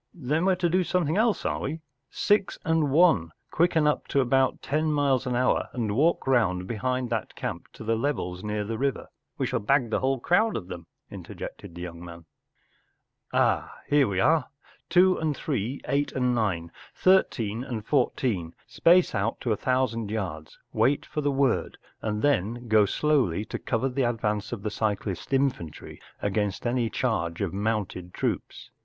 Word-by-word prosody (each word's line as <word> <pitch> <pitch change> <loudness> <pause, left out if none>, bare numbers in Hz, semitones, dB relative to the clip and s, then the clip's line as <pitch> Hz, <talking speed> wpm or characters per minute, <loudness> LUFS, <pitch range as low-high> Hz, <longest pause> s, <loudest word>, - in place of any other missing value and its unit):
Then 155 +2 -1
we 190 - +5
Ye - - -2
to 175 -1 +1
do 180 +2 +2
something 175 -3 0
else, 220 +1 +1
are - - 0
we? 160 - -4 0.3
Six 205 -2 +1
and 160 -2 +2
One, 140 - +4 0.2
quicken 165 -2 +2
up 150 - +1
to 140 - +1
about 130 0 +2
ten 155 +2 0
miles 140 -3 +1
an 125 - 0
hour 125 +1 +1
and 110 -5 -2
walk 160 +7 +2
round 95 -9 +2
behind 125 +3 -2
that 110 -3 -3
camp - - -5
to - - -10
the 115 +1 +1
levels 110 -8 -2
near 105 0 -2
the 110 +2 -4
river 135 0 -1
— - - -55
we - - 0
shall - - -1
bag 125 +1 +1
the - - +1
whole 135 0 0
crowd 215 - +2
of 95 -4 -8
them,” 85 -2 -8 0.2
interjected 85 - -8
the 85 - -6
young 85 -1 -8
man. 85 -1 -10 1.1
“Ah, - - +1
here 145 -3 +4
we 95 -2 -1
are! 155 +5 +3 0.4
Two 185 +1 +4
and 155 -3 -1
Three, 130 -2 -3
Eight 145 +1 0
and 125 -1 +1
Nine, 95 -8 -1 0.2
Thirteen 120 - +2
and 120 -5 -5
Fourteen, 115 - 0
space 175 +1 +4
out 100 -2 -1
to 120 - -1
a - - +3
thousand 115 -2 0
yards, 90 -8 -5 0.2
wait 140 +3 +2
for 150 - -3
the 145 - +1
word, 135 -3 +1 0.2
and 105 -1 -2
then 120 -3 0
go 110 -2 +5
slowly 125 - +1
to - - -5
cover 115 +2 -1
the 130 -2 0
advance 105 -3 -2
of 110 -4 -5
the 105 - -2
cyclist 105 -3 -2
infantry 130 - -2 0.2
against 100 0 -1
any 120 -1 +1
charge 85 -11 -1
of 100 -4 -2
mounted 100 -4 -2
troops. - - -3
120 Hz, 180 wpm, -26 LUFS, 105-145 Hz, 1.1 s, we